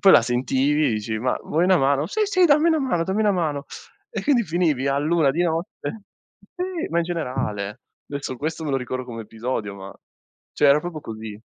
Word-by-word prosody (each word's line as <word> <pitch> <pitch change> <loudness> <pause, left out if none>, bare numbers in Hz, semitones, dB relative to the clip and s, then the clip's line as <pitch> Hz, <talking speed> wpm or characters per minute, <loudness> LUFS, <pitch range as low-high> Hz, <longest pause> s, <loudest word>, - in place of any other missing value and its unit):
poi 195 - +7
la - - +8
sentivi 135 +5 +1
e - - +3
dici: 110 +1 -2
"Ma 125 +3 0
vuoi 165 +3 +1
una 185 0 +5
mano?" 140 0 +2
"Sì, 430 - -1
sì, 370 -3 +4
dammi 300 +2 +5
una 320 -1 +3
mano, 250 - 0
dammi 190 +4 -1
una 210 -1 +3
mano". 155 -6 -1 0.4
E - - -4
quindi 265 -6 +3
finivi 160 -6 +1
all'1 145 +2 +2
di 165 +6 0
notte 170 +3 -3 0.5
sì, 360 -2 -3
ma 170 - 0
in 170 - +2
generale. 125 - -3 0.3
Adesso 140 -2 -4
questo 160 +3 -3
me 150 - -2
lo 135 - +2
ricordo 130 0 -4
come 115 -2 -7
episodio, 110 -2 -4
ma 95 0 -9 0.6
cioè 145 - +4
era 140 +2 +6
proprio 165 -1 -6
così. 110 -4 -8
150 Hz, 205 wpm, -23 LUFS, 125-180 Hz, 0.6 s, la